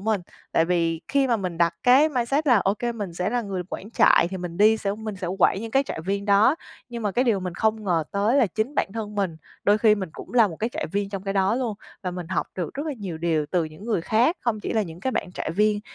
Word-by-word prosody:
mình. 215 Hz, -1 st, 0 dB, 0.3 s
Tại 165 Hz, -, +4 dB
vì 165 Hz, -2 st, 0 dB
khi 275 Hz, -1 st, +2 dB
mà 235 Hz, -, +2 dB
mình 185 Hz, -5 st, -4 dB
đặt 170 Hz, 0 st, +3 dB
cái 270 Hz, +5 st, +6 dB
mindset 275 Hz, +2 st, 0 dB
là, 245 Hz, -5 st, +6 dB
ô 195 Hz, +1 st, +1 dB
kê 240 Hz, +2 st, -2 dB
mình 200 Hz, -7 st, -6 dB
sẽ 180 Hz, +3 st, -1 dB
là 245 Hz, -1 st, 0 dB
người 190 Hz, -3 st, -3 dB
quản 210 Hz, -, -6 dB
trại 170 Hz, -, +5 dB
thì 190 Hz, -, -4 dB
mình 175 Hz, -2 st, -6 dB
đi 215 Hz, +2 st, +5 dB
sẽ 200 Hz, -2 st, -2 dB
mình 215 Hz, -1 st, -6 dB
sẽ 185 Hz, -1 st, -5 dB
quản 195 Hz, -, +3 dB
những 225 Hz, 0 st, -6 dB
cái 270 Hz, +4 st, +3 dB
trại 245 Hz, -, -5 dB
viên 200 Hz, +4 st, -2 dB
đó, 205 Hz, +7 st, +5 dB, 0.3 s
nhưng 235 Hz, -1 st, -6 dB
mà 205 Hz, -2 st, -1 dB
cái 250 Hz, +6 st, +2 dB
điều 215 Hz, -6 st, +2 dB
mình 180 Hz, -2 st, -4 dB
không 220 Hz, 0 st, 0 dB
ngờ 165 Hz, -4 st, +1 dB
tới 205 Hz, +6 st, +1 dB
là 260 Hz, -6 st, +5 dB
chính 220 Hz, -, -3 dB
bản 195 Hz, -, 0 dB
thân 215 Hz, -2 st, -5 dB
mình, 195 Hz, -5 st, -1 dB, 0.3 s
đôi 205 Hz, +1 st, +4 dB
khi 215 Hz, -2 st, +5 dB
mình 195 Hz, -4 st, -4 dB
cũng -, -, -10 dB
là 225 Hz, -4 st, +6 dB
một 165 Hz, -, -8 dB
cái 225 Hz, +2 st, -2 dB
trại -, -, -3 dB
viên 200 Hz, +3 st, -2 dB
trong 195 Hz, -2 st, -5 dB
cái 195 Hz, 0 st, -2 dB
đó 195 Hz, +3 st, +2 dB
luôn, 240 Hz, -4 st, -1 dB, 0.3 s
và 180 Hz, -, -2 dB
mình 180 Hz, -2 st, -6 dB
học 185 Hz, -, -1 dB
được 175 Hz, -3 st, -4 dB
rất 290 Hz, +3 st, -4 dB
là 305 Hz, -, -1 dB
nhiều 180 Hz, -6 st, -5 dB
điều 160 Hz, -3 st, 0 dB
từ 175 Hz, -2 st, +1 dB
những 155 Hz, +6 st, -10 dB
người 225 Hz, -6 st, 0 dB
khác, 235 Hz, -, +2 dB
không 220 Hz, -3 st, -1 dB
chỉ -, -, -3 dB
là 220 Hz, -2 st, +2 dB
những 170 Hz, -2 st, -8 dB
cái 260 Hz, -, -1 dB
bạn 180 Hz, -, -3 dB
trại -, -, -4 dB
viên 210 Hz, +4 st, +2 dB
205 Hz, 285 wpm, -24 LUFS, 180-230 Hz, 0.3 s, cái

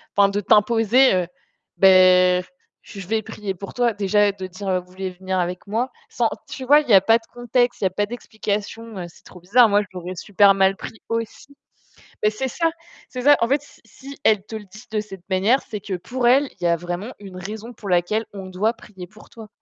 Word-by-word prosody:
enfin 200 Hz, -1 st, +5 dB
de 200 Hz, +1 st, -1 dB
t'imposer: 225 Hz, 0 st, +3 dB, 0.5 s
«Beh 185 Hz, -1 st, +6 dB, 0.4 s
je 195 Hz, -3 st, -10 dB
vais 220 Hz, +2 st, 0 dB
prier 210 Hz, -2 st, -6 dB
pour 195 Hz, +2 st, -9 dB
toi». 245 Hz, -1 st, +1 dB
Déjà 205 Hz, 0 st, +2 dB
de 190 Hz, -1 st, -7 dB
dire: 185 Hz, 0 st, -3 dB
«Vous 180 Hz, 0 st, -21 dB
voulez 190 Hz, 0 st, -5 dB
venir 185 Hz, +1 st, -3 dB
avec 180 Hz, +2 st, -3 dB
moi?» 235 Hz, +5 st, -2 dB, 0.2 s
Sans 235 Hz, -2 st, 0 dB, 0.2 s
tu 260 Hz, -, -7 dB
vois, 290 Hz, +3 st, +7 dB
il 300 Hz, -, -5 dB
n'y 225 Hz, -, +3 dB
a 190 Hz, -, +8 dB
pas 225 Hz, +3 st, +4 dB
de 225 Hz, -, -17 dB
contexte, 245 Hz, 0 st, 0 dB
il -, -, -3 dB
n'y -, -, +4 dB
a -, -, -2 dB
pas 205 Hz, +3 st, -1 dB
d'explication, 220 Hz, -1 st, -5 dB
heu, 175 Hz, -, -5 dB
c'est -, -, -21 dB
trop 180 Hz, -, -14 dB
bizarre. 220 Hz, +6 st, +5 dB
Moi, 205 Hz, +1 st, +3 dB
je 205 Hz, -, -8 dB
l'aurais 180 Hz, 0 st, -6 dB
super 200 Hz, +1 st, +4 dB
mal 195 Hz, 0 st, +3 dB
pris 220 Hz, -, -9 dB
aussi. 230 Hz, +5 st, -5 dB, 0.7 s
Mais 210 Hz, -, +3 dB
c'est 240 Hz, +5 st, -3 dB
ça, 330 Hz, +6 st, 0 dB, 0.4 s
c'est 250 Hz, -1 st, -6 dB
ça. 290 Hz, +2 st, +6 dB
En 230 Hz, -, +1 dB
fait, 280 Hz, +2 st, +1 dB
si 290 Hz, -, -19 dB
si 275 Hz, +1 st, -12 dB
elle 205 Hz, -3 st, +3 dB
te 220 Hz, -, -10 dB
le 215 Hz, -, -8 dB
dit 210 Hz, +4 st, -14 dB
de 215 Hz, -, 0 dB
cette 195 Hz, -4 st, -11 dB
manière, 200 Hz, +8 st, +2 dB
c'est 210 Hz, -, -5 dB
que 195 Hz, -1 st, -5 dB
pour 240 Hz, +7 st, -1 dB
elle, 275 Hz, +3 st, +4 dB
il -, -, -5 dB
y -, -, +3 dB
a 170 Hz, -, +3 dB
vraiment 175 Hz, +7 st, -5 dB
une 195 Hz, -3 st, -11 dB
raison 215 Hz, +5 st, -7 dB
pour 210 Hz, -3 st, -10 dB
laquelle 180 Hz, +5 st, +1 dB
on 195 Hz, -1 st, -7 dB
doit 190 Hz, +5 st, 0 dB
prier 190 Hz, -7 st, -12 dB
pour 215 Hz, +3 st, -17 dB
toi. 225 Hz, -2 st, -12 dB
205 Hz, 230 wpm, -22 LUFS, 185-230 Hz, 0.7 s, a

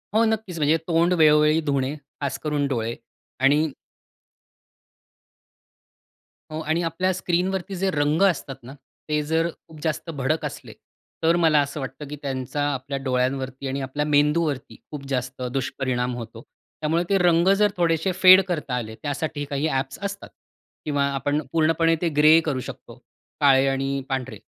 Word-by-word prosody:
हो. 225 Hz, -, +5 dB
नक्कीच. 220 Hz, -5 st, -2 dB
म्हणजे 155 Hz, +1 st, +3 dB
तोंड 170 Hz, +1 st, +3 dB
वेळोवेळी 150 Hz, +1 st, +5 dB
धुणे, 140 Hz, 0 st, 0 dB, 0.3 s
खासकरून 145 Hz, +1 st, -1 dB
डोळे 115 Hz, -3 st, -2 dB, 0.4 s
आणि 145 Hz, +4 st, +3 dB, 2.8 s
हो. 155 Hz, -, -4 dB
आणि 160 Hz, +2 st, 0 dB
आपल्या 185 Hz, +3 st, 0 dB
स्क्रीनवरती 185 Hz, +2 st, -1 dB
जे 190 Hz, +1 st, 0 dB
रंग 150 Hz, +1 st, +1 dB
असतात 140 Hz, -6 st, -4 dB
ना 130 Hz, +3 st, -10 dB, 0.4 s
ते 150 Hz, 0 st, +1 dB
जर 160 Hz, +2 st, +1 dB, 0.2 s
खूप 160 Hz, -1 st, -13 dB
जास्त 160 Hz, +1 st, -2 dB
भडक 155 Hz, +1 st, -1 dB
असले, -, -, -7 dB, 0.5 s
तर 165 Hz, +1 st, +4 dB
मला 160 Hz, -3 st, +4 dB
असं 140 Hz, +1 st, -4 dB
वाटतं, 135 Hz, +2 st, -7 dB
की 150 Hz, -, -6 dB
त्यांचा 135 Hz, 0 st, -3 dB
आपल्या 135 Hz, +1 st, -4 dB
डोळ्यांवरती 130 Hz, +1 st, -1 dB
आणि 135 Hz, +1 st, -3 dB
आपल्या 140 Hz, +3 st, -2 dB
मेंदूवरती 150 Hz, -1 st, +1 dB, 0.2 s
खूप 145 Hz, -2 st, -7 dB
जास्त 125 Hz, -1 st, -3 dB
दुष्परिणाम 125 Hz, -2 st, -2 dB
होतो. 115 Hz, -1 st, -8 dB, 0.4 s
त्यामुळे 160 Hz, +3 st, +1 dB
ते 200 Hz, -, +3 dB
रंग 175 Hz, -1 st, +3 dB
जर 210 Hz, -1 st, +4 dB
थोडेसे 165 Hz, +1 st, +1 dB
फेड 185 Hz, 0 st, +9 dB
करता 150 Hz, -8 st, -2 dB
आले 110 Hz, -3 st, -4 dB
त्यासाठी 145 Hz, +2 st, -4 dB
काही 140 Hz, +2 st, -1 dB
ॲप्स 135 Hz, -2 st, -2 dB
असतात. 200 Hz, 0 st, -5 dB, 0.6 s
किंवा 145 Hz, -2 st, 0 dB
आपण 145 Hz, +2 st, 0 dB
पूर्णपणे 165 Hz, 0 st, +3 dB
ते 175 Hz, -, +1 dB
ग्रे 155 Hz, +2 st, +7 dB
करू 140 Hz, -5 st, -1 dB
शकतो, -, -, -11 dB, 0.5 s
काळे 135 Hz, -1 st, +5 dB
आणि 135 Hz, 0 st, -1 dB
पांढरे 130 Hz, -5 st, -3 dB
150 Hz, 145 wpm, -24 LUFS, 135-165 Hz, 2.8 s, फेड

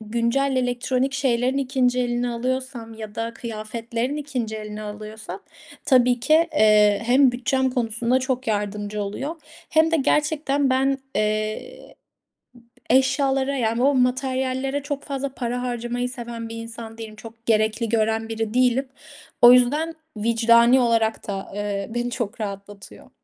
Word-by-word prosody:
güncel 235 Hz, +5 st, 0 dB
elektronik 255 Hz, +1 st, 0 dB
şeylerin 260 Hz, -1 st, +1 dB
2'nci 255 Hz, -2 st, +1 dB
elini 245 Hz, 0 st, -1 dB
alıyorsam 250 Hz, -1 st, -3 dB
ya 215 Hz, -1 st, -8 dB
da 230 Hz, +1 st, -4 dB
kıyafetlerin 230 Hz, +3 st, -4 dB
2'nci 255 Hz, -7 st, -3 dB
elini 215 Hz, 0 st, -7 dB
alıyorsam 215 Hz, -, -8 dB, 0.4 s
tabii 250 Hz, -2 st, +4 dB
ki, 315 Hz, +7 st, +4 dB
eee, 210 Hz, -1 st, +4 dB
hem 255 Hz, +1 st, +5 dB
bütçem 260 Hz, +2 st, 0 dB
konusunda 235 Hz, 0 st, 0 dB
çok 260 Hz, -1 st, -2 dB
yardımcı 205 Hz, 0 st, -2 dB
oluyor 270 Hz, +11 st, -4 dB, 0.3 s
hem 320 Hz, 0 st, +4 dB
de 330 Hz, -, +3 dB
gerçekten 290 Hz, -1 st, +1 dB
ben, 270 Hz, +1 st, +2 dB, 0.2 s
eee, 215 Hz, -, -3 dB, 0.9 s
eşyalara, 270 Hz, +2 st, +2 dB
yani, 230 Hz, 0 st, 0 dB
o 280 Hz, +1 st, +4 dB
materyallere 260 Hz, +2 st, 0 dB
çok 285 Hz, -1 st, -4 dB
fazla 280 Hz, -1 st, -3 dB
para 245 Hz, 0 st, -3 dB
harcamayı 245 Hz, 0 st, -3 dB
seven 235 Hz, -2 st, -7 dB
bir 230 Hz, -, -7 dB
insan 230 Hz, 0 st, -8 dB
değilim. 220 Hz, -1 st, -8 dB
Çok 225 Hz, +1 st, -13 dB
gerekli 220 Hz, +1 st, +1 dB
gören 225 Hz, 0 st, 0 dB
biri 225 Hz, -1 st, -3 dB
değilim. 255 Hz, +1 st, +2 dB, 0.5 s
O 240 Hz, 0 st, +10 dB
yüzden, 295 Hz, +7 st, +2 dB, 0.2 s
vicdani 235 Hz, +3 st, +4 dB
olarak 230 Hz, -2 st, +1 dB
da, 195 Hz, -2 st, -5 dB
eee, 205 Hz, -1 st, -3 dB
beni 240 Hz, 0 st, -1 dB
çok 235 Hz, -2 st, -4 dB
rahatlatıyor. 200 Hz, -1 st, -8 dB
240 Hz, 135 wpm, -23 LUFS, 220-265 Hz, 0.9 s, O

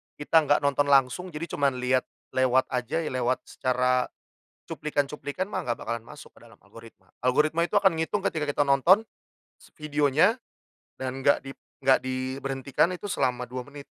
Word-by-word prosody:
kita 160 Hz, +2 st, +3 dB
nggak 145 Hz, -, +4 dB
nonton 140 Hz, 0 st, +2 dB
langsung 140 Hz, +6 st, +3 dB
jadi 155 Hz, +2 st, -5 dB
cuman 140 Hz, -3 st, 0 dB
liat, 130 Hz, +1 st, +1 dB, 0.3 s
lewat 130 Hz, 0 st, +3 dB
aja 125 Hz, +6 st, -1 dB
ya, -, -, -4 dB
lewat 130 Hz, 0 st, -1 dB
secara, 125 Hz, 0 st, 0 dB, 0.6 s
cuplikan-cuplikan 150 Hz, +4 st, -3 dB
mah -, -, -2 dB
nggak 120 Hz, -, -1 dB
bakalan 115 Hz, -1 st, -4 dB
masuk -, -, -12 dB
ke -, -, -21 dB
dalam -, -, -17 dB
algoritma 115 Hz, 0 st, -16 dB
algoritma 155 Hz, +7 st, +2 dB
itu -, -, -5 dB
akan 195 Hz, -5 st, +3 dB
ngitung 190 Hz, +5 st, -1 dB
ketika 155 Hz, -6 st, -1 dB
kita 145 Hz, 0 st, +1 dB
nonton, 145 Hz, +10 st, +4 dB, 0.5 s
s -, -, -21 dB
videonya, 150 Hz, -, +2 dB, 0.6 s
dan 130 Hz, +1 st, -4 dB
nggak 140 Hz, -, +4 dB
dip 135 Hz, 0 st, -10 dB, 0.2 s
nggak 135 Hz, -1 st, +4 dB
diberhentikan 135 Hz, +4 st, -1 dB
itu 180 Hz, +3 st, -6 dB
selama 125 Hz, -8 st, -1 dB
2 125 Hz, +1 st, -6 dB
menit. 145 Hz, 0 st, -11 dB
140 Hz, 165 wpm, -26 LUFS, 130-155 Hz, 0.6 s, nggak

